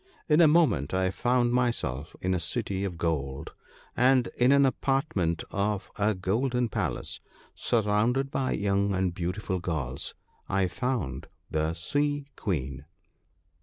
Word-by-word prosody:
In 150 Hz, +2 st, +5 dB
a 165 Hz, -, +8 dB
moment 150 Hz, -, +3 dB
I 95 Hz, 0 st, +1 dB
found 120 Hz, +3 st, +2 dB
myself 115 Hz, -, -1 dB
in 95 Hz, 0 st, 0 dB
a 90 Hz, -, +1 dB
city 100 Hz, 0 st, -1 dB
of 90 Hz, -4 st, -3 dB
gold; 70 Hz, -5 st, -2 dB, 0.4 s
and 125 Hz, 0 st, +4 dB
in 125 Hz, +2 st, +4 dB
an 140 Hz, 0 st, +6 dB
apartment 130 Hz, -, 0 dB
of 100 Hz, -2 st, -1 dB
a 105 Hz, 0 st, +1 dB
golden 120 Hz, +6 st, 0 dB
palace, -, -, -2 dB, 0.3 s
sur 115 Hz, -2 st, +1 dB
rounded 120 Hz, +7 st, +1 dB
by 130 Hz, -1 st, 0 dB
young 100 Hz, 0 st, +1 dB
and 95 Hz, -2 st, 0 dB
beautiful 90 Hz, +2 st, -2 dB
girls, 75 Hz, -7 st, -3 dB, 0.3 s
I 95 Hz, -1 st, +2 dB
found 115 Hz, -, -2 dB, 0.2 s
the 80 Hz, +1 st, 0 dB
Sea 145 Hz, -, 0 dB
queen. 70 Hz, -, -3 dB
100 Hz, 135 wpm, -28 LUFS, 85-125 Hz, 0.4 s, a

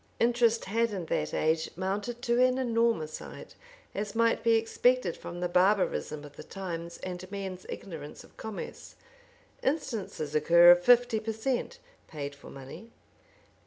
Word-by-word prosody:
Interest 235 Hz, -1 st, +3 dB
had 230 Hz, +4 st, +1 dB
in 185 Hz, -4 st, -4 dB
that 75 Hz, -, -1 dB
age 160 Hz, +1 st, +1 dB
mounted 205 Hz, +6 st, -3 dB
to 240 Hz, +1 st, +3 dB
an 255 Hz, 0 st, +3 dB
enormous 230 Hz, -10 st, 0 dB
height, -, -, -10 dB, 0.4 s
as 205 Hz, +2 st, -4 dB
might 230 Hz, 0 st, +3 dB
be 230 Hz, 0 st, +4 dB
expected 225 Hz, -3 st, +2 dB
from 175 Hz, +1 st, -8 dB
the 180 Hz, -, +1 dB
barbarism 180 Hz, -4 st, +1 dB
of 145 Hz, -, -14 dB
the -, -, -8 dB
times 170 Hz, -3 st, -6 dB
and 185 Hz, 0 st, -6 dB
men's 190 Hz, -2 st, -6 dB
ignorance 155 Hz, -6 st, -8 dB
of -, -, -20 dB
commerce. 220 Hz, -2 st, -8 dB, 0.7 s
Instances 215 Hz, -, -2 dB
occur 170 Hz, +3 st, +7 dB
of 175 Hz, 0 st, +5 dB
fifty 245 Hz, -1 st, +5 dB
per 225 Hz, +1 st, -3 dB
cent. 255 Hz, -, -2 dB, 0.3 s
paid 145 Hz, -2 st, -6 dB
for 140 Hz, -, -13 dB
money. 135 Hz, +12 st, -10 dB
195 Hz, 150 wpm, -29 LUFS, 170-230 Hz, 0.7 s, occur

